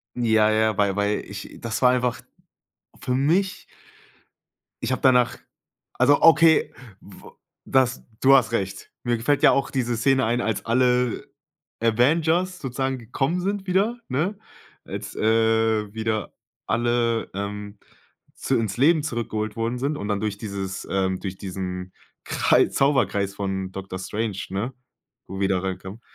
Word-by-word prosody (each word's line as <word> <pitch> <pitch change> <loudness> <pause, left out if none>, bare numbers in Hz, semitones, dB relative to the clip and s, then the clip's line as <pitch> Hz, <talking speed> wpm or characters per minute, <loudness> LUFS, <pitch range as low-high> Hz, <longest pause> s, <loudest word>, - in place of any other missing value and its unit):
Ja, 110 -3 +3
ja, 110 -1 +2
weil 100 -1 +2
weil 105 0 0
ich, 100 -1 -8
das 115 +1 -4
war 125 - +6
einfach 125 -1 -1 0.7
für 125 - -2
mich 165 +9 +1 1.2
ich 120 - -1
hab 130 - -1
danach 125 -2 +4 0.6
also 140 +3 +3
okay, 165 0 +5 0.3
w 100 - -14 0.3
das, 130 -1 +1 0.2
du 135 +1 +7
hast 125 -3 +3
recht. 95 -3 -3
Mir 120 -1 0
gefällt 140 +5 0
ja - - +8
auch 140 - 0
diese 120 -3 -1
Szene 130 +2 +2
ein, 120 +2 0
als 110 -3 -2
alle 125 0 +1 0.6
Avengers 160 +10 +2
sozusagen 135 0 -2
gekommen 135 +9 -2
sind 195 +1 -3
wieder, 205 +6 +1
ne? 165 +11 -1 0.5
Als, - - -7
äh, 110 -1 +2
wieder 110 -2 -2 0.3
alle, 120 -1 0
ähm, 100 +1 -6 0.6
zu - - -1
ins 110 -2 -2
Leben 155 +4 +4
zurückgeholt 110 -6 -3
worden 115 +2 -2
sind 145 +3 -1
und 105 - -5
dann 105 -1 -1
durch 105 -2 -2
dieses, 100 -3 -5
ähm, 95 -1 0
durch 95 -2 -6
diesen 90 -1 -5 0.3
Krei - - +3
Zauberkreis 100 -8 +1
von 95 -1 -3
Doctor 95 -1 -7
Strange, 105 +1 -3
ne, 110 +7 -3 0.5
wo 95 +1 -7
wieder 95 -2 +1
reinkommt. 95 +3 -5
115 Hz, 140 wpm, -24 LUFS, 100-130 Hz, 1.2 s, ja